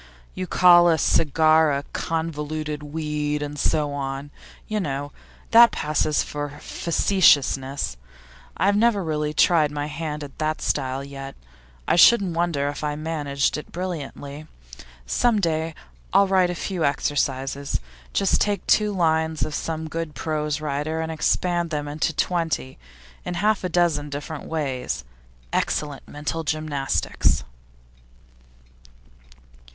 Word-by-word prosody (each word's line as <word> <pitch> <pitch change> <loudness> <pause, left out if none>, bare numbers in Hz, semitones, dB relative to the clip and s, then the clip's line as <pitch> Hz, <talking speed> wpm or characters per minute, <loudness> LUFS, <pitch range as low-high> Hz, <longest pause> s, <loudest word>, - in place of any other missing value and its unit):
You 185 - -4
call 175 0 +6
a 165 - +3
cigar 155 +1 +4
a 140 0 -1
"convoluted 155 -2 -3
weed," 150 -1 -2
and 145 0 -6
so 150 -1 +1
on, 140 0 -4 0.4
you 215 0 -1
know; 145 -5 -3 0.4
that 235 +1 +9
passes 150 0 0
for 145 0 -5
facetiousness. 140 - +2 0.6
I've 200 +2 +3
never 210 -2 +3
really 150 -2 -1
tried 155 0 +4
my 145 0 -3
hand 150 0 -4
at 140 -2 -11
that 155 0 -1
style 130 +1 -1
yet; 135 -1 -8 0.5
I - - +3
shouldn't 195 -2 +6
wonder 165 -5 0
if 145 +1 -6
I 150 -1 -1
managed 150 -3 -1
it 150 - -9
brilliantly. 155 -4 -6 0.6
Some 225 - +2
day 160 -3 -1 0.4
I'll 200 +1 +6
write 190 -2 +3
a 175 - -3
few 180 0 -3
exercises; 140 -1 -1 0.3
just 195 - +2
take 205 -3 0
two 210 -1 +3
lines 160 -3 +1
of 155 - -6
some 160 +1 -3
good 160 0 -5
prose 150 -1 -2
writer, 150 +2 -2
and 160 0 -2
expand 175 +2 0
them 150 -2 -3
into 150 +2 -1
twenty, 165 - -1 0.4
in 175 - -4
half 210 +2 +1
a 185 - -1
dozen 165 -4 +1
different 145 +2 -6
ways. 130 - -3 0.5
Excellent 145 -3 -1
mental 150 +2 -4
gymnastics! 155 -3 0
155 Hz, 130 wpm, -23 LUFS, 145-170 Hz, 0.6 s, that